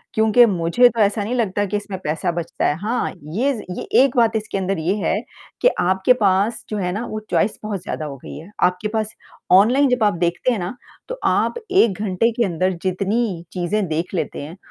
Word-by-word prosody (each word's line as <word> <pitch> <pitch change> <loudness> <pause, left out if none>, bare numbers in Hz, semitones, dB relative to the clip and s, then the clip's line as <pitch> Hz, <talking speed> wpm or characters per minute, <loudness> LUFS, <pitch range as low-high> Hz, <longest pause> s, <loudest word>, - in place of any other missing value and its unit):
क्योंकि 220 +2 +5
मुझे 185 +4 +3
तो 230 -1 -6
ऐसा 205 +1 +2
नहीं 220 +5 -3
लगता 205 -4 0
कि 205 +1 -2
इसमें 200 -2 -6
पैसा 160 +4 -1
बचता 170 -1 -3
है। 145 - +1
हाँ, 225 +6 -1
ये 210 - 0
ज़ 225 - -6 0.2
ये - - -4 0.2
एक 275 -1 0
बात 230 -2 +3
इसके 215 -2 -2
अंदर 195 0 -1
ये 165 +4 0
है 190 -2 0 0.5
कि - - +5
आपके 190 +7 +3
पास 200 +3 +2
जो 215 - -3
है 180 -3 -1
ना, 210 +6 -3
वो 215 - -5
चॉइस 210 - +1
बहुत 205 -3 -4
ज़्यादा 155 -6 -4
हो 145 -2 -6
गई - - -10
है। 160 +5 -11
आपके 180 +3 +1
पास 220 -1 -1 0.4
ऑनलाइन 245 +9 +5
जब 250 -2 +1
आप 210 - +3
देखते 175 +8 0
हैं, 230 - -1
ना, 180 +6 -4 0.3
तो - - -5
आप - - +2 0.2
1 230 - +3
घंटे 215 +3 +1
के 235 - +3
अंदर 185 0 0
जितनी 195 0 -1
चीज़ें 190 +3 -1
देख 165 +4 -3
लेते 180 - -3
हैं, 155 +6 -9
200 Hz, 215 wpm, -21 LUFS, 180-225 Hz, 0.5 s, क्योंकि